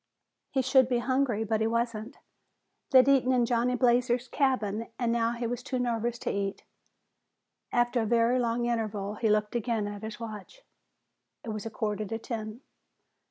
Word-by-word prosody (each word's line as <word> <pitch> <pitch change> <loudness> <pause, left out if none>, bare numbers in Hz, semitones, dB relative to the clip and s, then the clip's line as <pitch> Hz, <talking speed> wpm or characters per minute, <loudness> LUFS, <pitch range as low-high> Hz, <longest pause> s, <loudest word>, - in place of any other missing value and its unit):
He 265 -2 0
should 260 -1 +4
be 245 - +2
hungry 245 -2 +1
but 220 0 0
he 220 - +2
wasn't. 230 0 -2 0.7
They'd 260 -1 +6
eaten 265 -2 +4
in 245 -2 +3
Johnny 240 +1 +1
Blazer's 245 0 +2
cabin, 230 -5 0
and 240 -2 0
now 230 0 +1
he 240 0 -4
was 245 +1 -3
too 255 +1 -3
nervous 240 -1 -1
to - - +1
eat. 200 0 -3 1.1
After 240 0 +2
a 220 - -1
very 235 +2 +3
long 235 0 0
interval, 215 -4 -2
he 220 +1 0
looked 210 0 +1
again 230 -2 -1
at 205 -1 -6
his 220 0 -7
watch. 225 - -8 0.8
It - - -7
was 215 0 -4
a - - -4
quarter 215 -1 -2
to 225 +3 -3
ten. 225 0 -6
235 Hz, 170 wpm, -29 LUFS, 220-245 Hz, 1.1 s, They'd